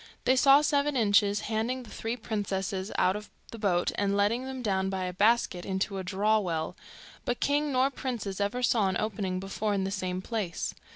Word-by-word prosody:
They 260 - +4
saw 275 +2 +7
Seven 290 -1 +1
Inches 205 -2 +3
handing 230 +4 -2
the 230 - -13
three 225 +2 -3
princesses 195 -3 -3
out 185 - +3
of 210 0 -7 0.2
the 230 - -8
boat, 180 -4 +1
and 200 0 +1
letting 225 +5 +1
them 265 -1 -5
down 190 -3 0
by 190 -1 -2
a 180 0 -3
basket 205 -2 +2
into 195 +1 -2
a - - -4
draw 210 +4 +2
well, 165 -5 -2 0.5
but 245 - -2
king 290 +1 +1
nor 260 +1 +2
princes 220 -8 -4
ever 210 +5 -1
saw 225 -4 +3
an 185 - 0
opening 195 -4 -2
before 200 +2 -2
in 195 - 0
the 190 - -2
same 185 -2 -2
place. 195 -4 -3
205 Hz, 195 wpm, -29 LUFS, 190-240 Hz, 0.5 s, saw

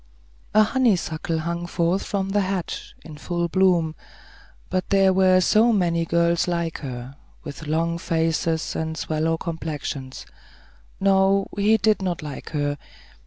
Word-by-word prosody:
A 215 - +7
honeysuckle 185 - 0
hung 170 +2 -3
forth 175 +2 0
from 195 -1 -2
the 205 +1 +2
hedge, 190 -2 -4
in 150 -2 -10
full 175 +1 -2
bloom; 175 -3 +2 0.7
but 185 -1 -2
there 195 -1 +4
were 185 -1 +5
so 220 +5 +4
many 170 -5 +1
girls 170 +1 +2
like 170 -2 -2
her, 130 -1 -7 0.3
with 145 +2 -8
long 165 +2 0
faces 165 -1 -1
and 160 0 -3
sallow 160 +1 -1
complexions. 150 -5 -5 0.7
No; 195 0 +3
he 210 +2 +3
did 215 -1 +2
not 175 -4 -2
like 145 -2 -7
her. 145 -2 -2
170 Hz, 135 wpm, -23 LUFS, 160-190 Hz, 0.7 s, A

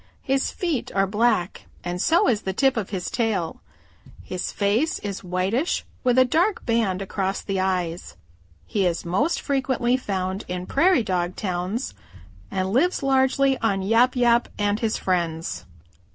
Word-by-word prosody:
His 270 0 +1
feet 335 -8 -2
are 195 0 +3
black 205 -3 0 0.2
and 175 +1 -3
so 335 +2 +3
is 225 -5 +2
the 190 - -3
tip 270 +6 +3
of 215 -5 -2
his 185 -3 -4
tail. 215 -8 -1 0.6
His 185 -1 -4
face 215 +10 +1
is 200 -2 -5
whitish 190 - -1 0.2
with 250 0 +2
a 255 - +7
dark 350 - +1
band 220 -5 +1
across 195 0 -2
the 195 -1 -2
eyes. 180 -2 -2 0.5
He 195 -3 +1
is 170 0 -2
most 255 - +1
frequently 260 -3 0
found 190 -4 -3
in 180 0 -4
Prairie 315 - +3
dog 180 -2 -1
towns 185 +5 -3 0.6
and 190 +1 -2
lives 325 +6 +2
largely 270 0 +3
on 200 -4 0
Yap 230 +6 +3
Yap 240 -1 +3
and 205 0 +1
his 225 -2 0
friends. 170 -3 -2
210 Hz, 150 wpm, -24 LUFS, 185-255 Hz, 0.6 s, a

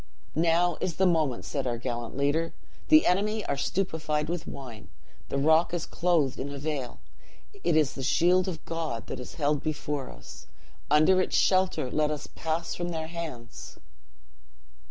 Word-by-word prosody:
'Now 170 +1 +2
is 175 - -1
the 190 - +2
moment!' 155 -8 +1
said 135 -3 -2
our 120 -1 -1
gallant 120 0 -4
leader; 145 +4 +1 0.3
'the 310 0 +7
enemy 210 +4 +1
are 140 - 0
stupefied 155 -2 -1
with 175 -1 -3
wine, 120 -6 -9 0.4
the - - -1
rock 160 +5 +4
is 170 - -2
clothed 165 -7 +1
in 140 - -3
a 140 - -6
veil! 140 -4 -4 0.6
it 160 - +2
is 155 -3 +3
the 135 - -6
shield 175 +7 +3
of 170 -5 -5
God 160 -9 -3
that - - -6
is 125 - -8
held 150 -2 +1
before 150 -3 -3
us! - - -12 0.4
under 155 +6 +5
its - - 0
shelter 185 -8 +2
let 150 -1 +2
us 150 -1 -3
pass 160 +1 -3
from 175 0 -3
their 160 -2 -3
hands!" 150 - -7
155 Hz, 165 wpm, -28 LUFS, 140-175 Hz, 0.6 s, the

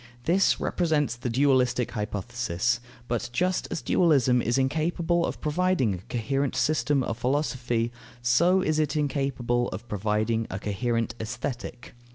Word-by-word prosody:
This 185 +6 +3
represents 155 -8 0
the 120 +1 -4
dualistic 125 -1 +2
hypothesis. 115 +1 -1 0.3
But 120 -1 -2
just 180 +8 0
as 175 - -4
dualism 135 -8 +3
is 120 +3 0
incapable 165 +5 +1
of - - -5
providing 155 - +1
a - - -3
coherent 135 +7 -2
system 145 0 +1
of 115 -1 -4
philosophy, 125 -3 0 0.3
so 170 +11 +3
is 155 -3 +1
it 150 -2 0
incapable 135 -5 0
of 105 +6 -7
providing 110 +2 0
a 95 - -4
coherent 115 +3 -1
Aesthetic. 120 +1 -5
125 Hz, 135 wpm, -26 LUFS, 115-150 Hz, 0.3 s, This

